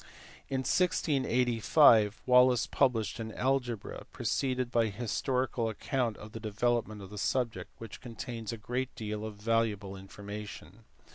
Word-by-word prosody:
In 135 -1 0
1685 125 - +3
Wallis 125 -1 +5
published 125 -5 +1
an 110 -1 -4
Algebra, 125 -4 -1
preceded 130 -2 -1
by 115 -2 +3
a - - -1
his 110 +2 -4
torical 125 -2 0
account 120 +1 -1
of 105 0 -10
the 115 - -7
development 110 -1 -1
of 95 - -11
the 105 - -6
subject, 120 0 -1
which 115 -3 -9
contains 115 -2 -6
a 115 - -5
great 125 +4 -3
deal 105 -1 -4
of 110 -1 -5
valuable 105 -2 0
information. 100 0 -9
115 Hz, 140 wpm, -31 LUFS, 105-125 Hz, -, Wallis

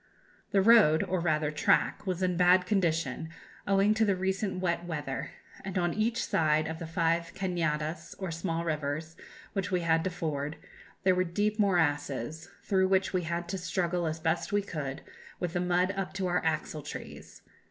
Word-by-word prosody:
"The 195 -1 +3
road, 210 -8 +6
or 185 - -1
rather 155 -3 +1
track, 155 +5 +1
was 185 0 -1
in 180 - +2
a - - -3
bad 180 +1 +5
condition, 165 - 0 0.4
owing 200 +1 +4
to 220 +1 +2
the 200 -3 +3
recent 190 +1 -1
wet 175 -2 0
weather, 150 -5 -4 0.3
and 190 -1 -4
on 175 -1 +1
each 225 +2 0
side 155 -1 +2
of 160 0 -5
the 165 - -5
five 165 +1 0
cañadas, 165 -3 -2
or 190 -3 -4
small 165 0 -2
rivers, 155 +1 -3 0.4
which 195 0 -1
we 180 -2 +1
had 165 -1 +2
to - - +1
ford, 155 -4 -3 0.5
there 185 - +5
were 180 0 +2
deep 205 +5 -1
morasses, 155 - 0
through 190 -1 +2
which 190 0 +2
we 185 - +1
had 170 +1 -3
to 190 +1 -2
struggle 175 0 -1
as 160 +1 -3
best 160 +1 -1
we 205 0 +2
could, 145 -8 -5 0.4
with 175 -2 -2
the 175 - 0
mud 180 +1 +2
up 195 -1 -4
to 190 -1 -2
our 180 0 +1
axle 155 -1 -1
trees. - - -9
175 Hz, 185 wpm, -30 LUFS, 160-190 Hz, 0.5 s, road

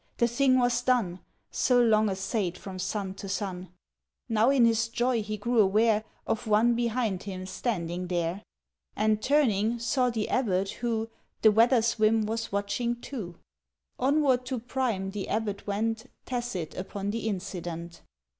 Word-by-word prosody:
The 235 - +3
thing 255 +2 +3
was 245 -1 +2
done 235 -8 +1 0.3
So 250 -1 +3
long 220 -3 +4
assayed 190 -1 -2
from 190 -2 -8
sun 190 0 -3
to 195 0 -8
sun... 185 -3 -4 0.6
—Now 225 +1 +3
in 270 -4 +5
his 230 0 +2
joy 240 0 0
he 215 0 -4
grew 235 +3 0
aware 215 +2 +3 0.2
Of 225 - -2
one 220 +3 +4
behind 230 -5 -1
him 185 -2 -6
standing 180 -4 -3
there, 175 +1 -1 0.5
And, 215 0 +1
turning, 235 -5 +2
saw 250 +2 +1
the 220 -3 -2
abbot, 195 -6 +1
who 225 -2 -2 0.3
The 220 - +8
weather's 230 +1 +3
whim 215 0 +3
was 225 +1 -3
watching 220 +4 -1
too. 210 -11 -6 0.6
Onward 270 -1 +3
to 260 -1 -2
Prime 230 -5 -2
the 200 -1 -5
abbot 210 -2 -2
went, 225 +3 -1 0.2
Tacit 240 -10 -3
upon 200 +2 -4
the 225 0 -3
incident. 175 -4 -5
220 Hz, 150 wpm, -28 LUFS, 195-240 Hz, 0.6 s, The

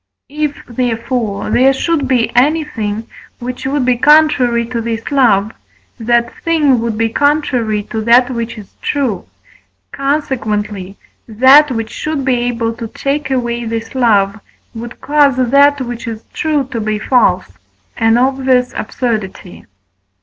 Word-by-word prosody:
If, 295 0 -3
therefore, 235 -3 -2
there 265 +2 +4
should 290 0 -1
be 250 -3 0
anything 245 -6 0 0.3
which 250 +1 -5
would 275 -1 0
be 250 -1 +2
contrary 260 -6 +4
to 235 0 -4
this 230 +2 -4
love, 220 -7 +3 0.5
that 235 +1 +1
thing 300 -6 +2
would 225 -1 -2
be 225 0 +1
contrary 245 -6 0
to 220 +1 -5
that 245 +2 +4
which 235 -1 -4
is 205 -2 -12
true; 270 -8 -2 0.6
consequently, 215 -9 -2 0.3
that, 260 +7 +6
which 225 -3 -4
should 305 -3 -3
be 260 - +2
able 240 -1 -1
to 230 -2 -5
take 275 +4 -3
away 240 -2 -1
this 225 0 -4
love, 215 -5 +2 0.3
would 230 +1 -9
cause 290 -2 +3
that 280 +3 +4
which 240 -1 -5
is 225 -1 -6
true 310 -6 -1
to 230 - -3
be 215 0 -1
false; 210 - +1 0.4
an 225 +1 +2
obvious 260 -1 +1
absurdity. 215 -6 -4
245 Hz, 135 wpm, -15 LUFS, 225-275 Hz, 0.6 s, that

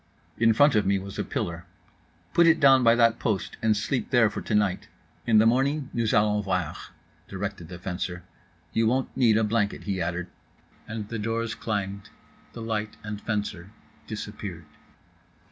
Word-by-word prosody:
In 115 0 +5
front 145 +5 +5
of 105 -2 +3
me 100 +1 +2
was 95 0 -7
a - - +1
pillar. 85 0 -4 0.7
"Put 170 -1 +5
it 165 0 +5
down 135 -3 +6
by 115 0 +6
that 115 -1 +3
post, 105 -5 -2
and 110 -1 +2
sleep 125 +5 -2
there 115 -4 +4
for - - -5
tonight, 105 -3 0 0.4
in 110 -2 +5
the 110 - +6
morning 135 +4 +1
nous 115 -2 0
allons 105 -2 +2
voir" 90 -5 -1 0.5
directed 100 -3 -5
the 90 +1 -8
fencer. 90 0 -4 0.5
"You 115 0 +2
won't 130 +3 0
need 115 -4 +4
a 110 - +2
blanket," 105 -1 0
he 95 -2 -2
added; 85 +1 -2 0.6
and 110 -2 -5
the 115 - -4
doors 115 +1 -2
clanged, 100 -2 -4 0.4
the 115 - -7
light 110 -1 -3
and 105 -1 -6
fencer 105 -5 -3 0.4
disappeared. 105 -5 -6
105 Hz, 165 wpm, -26 LUFS, 100-115 Hz, 0.7 s, down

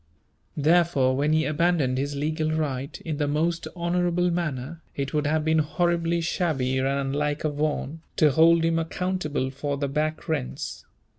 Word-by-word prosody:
Therefore, 155 -4 +3
when 145 +3 +1
he 155 0 +3
abandoned 155 -4 +1
his 140 +1 -2
legal 155 +2 -1
right, 140 -4 -2
in 155 -3 -4
the 145 -1 0
most 165 +4 0
honourable 175 0 +1
manner, 165 -2 -3
it 140 -1 -3
would 150 -1 +1
have 155 0 +1
been 160 0 +3
horribly 170 +2 +1
shabby 145 -7 0
and 130 - +1
unlike 140 +2 -1
a 155 - +1
Vaughan, 150 +1 -2
to 155 -3 +4
hold 165 +3 +5
him 165 0 +2
accountable 165 -5 -2
for 140 +1 -3
the 140 0 -1
back 155 +4 -2
rents. 65 - -3
155 Hz, 160 wpm, -25 LUFS, 140-170 Hz, -, hold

